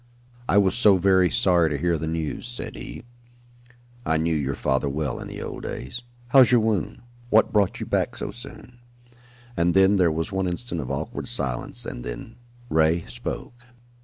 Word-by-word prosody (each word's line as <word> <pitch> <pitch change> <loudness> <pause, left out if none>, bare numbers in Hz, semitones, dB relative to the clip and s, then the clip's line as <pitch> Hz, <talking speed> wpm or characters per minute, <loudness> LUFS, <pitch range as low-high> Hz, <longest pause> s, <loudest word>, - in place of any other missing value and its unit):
"I 100 - +4
was 95 -2 +4
so 105 -5 +5
very 95 -1 +4
sorry 85 -1 +3
to 75 - -1
hear 85 +3 +1
the 80 0 -3
news," 80 +6 -3
said 120 0 -6
he. - - -8 1.0
"I 80 -6 +1
knew 80 +1 +1
your 70 -3 -1
father 65 +1 0
well 70 -2 -2
in - - -7
the - - -7
old - - -6
days. 120 - -5 0.3
How's 130 -2 +7
your 120 - +6
wound? 110 -1 -1 0.3
What 110 -1 +4
brought 105 -3 +2
you - - -4
back - - -1
so - - -4
soon?" 120 -1 -11 0.8
And 85 0 +2
then 95 +1 +5
there 90 -3 +4
was 80 +3 -2
one 95 -1 -1
instant 90 -1 -3
of 65 - -6
awkward - - -4
silence 60 -2 -2
and - - -6
then - - -7 0.3
Ray 80 -2 +2
spoke. 120 0 -7
90 Hz, 180 wpm, -24 LUFS, 80-105 Hz, 1.0 s, How's